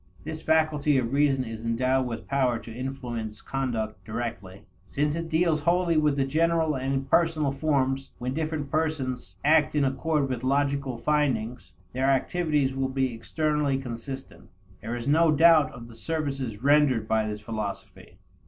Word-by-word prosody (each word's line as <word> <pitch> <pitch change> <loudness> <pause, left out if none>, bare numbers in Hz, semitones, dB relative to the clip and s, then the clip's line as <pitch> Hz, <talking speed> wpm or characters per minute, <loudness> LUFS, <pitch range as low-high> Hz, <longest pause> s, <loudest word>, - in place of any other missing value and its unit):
This 155 +1 -6
faculty 155 -2 +2
of 125 -1 -1
reason 140 -2 +3
is 115 -2 -7
endowed 130 +3 +1
with 115 -2 -6
power 130 -4 +1
to 115 0 -10
influence 120 -4 -5
conduct 120 -6 -3
directly. 110 -3 -6 0.2
Since 150 +7 0
it 165 0 -4
deals 160 -1 +2
wholly 170 +2 +2
with 145 -3 +2
general 160 +2 +2
and 130 +1 -2
impersonal 150 +2 +1
forms, 135 -2 0
when 125 +1 -3
different 155 -2 -3
persons 130 - -2
act 155 0 +4
in 145 -2 +3
accord 140 +2 0
with 130 -2 -4
logical 140 -1 0
findings, 120 - -1 0.2
their 130 +2 +1
activities 145 -1 +1
will 135 0 -1
be 130 -2 0
externally 150 +4 0
consistent. 135 +1 -8 0.3
There 115 +3 -4
is 120 +1 -5
no 160 +3 +4
doubt 155 0 +5
of 120 -4 -10
the 120 - -13
services 135 -6 -4
rendered 140 -6 +4
by 110 -1 +1
this 105 0 -5
philosophy. 105 -2 -6
135 Hz, 155 wpm, -26 LUFS, 120-150 Hz, 0.3 s, doubt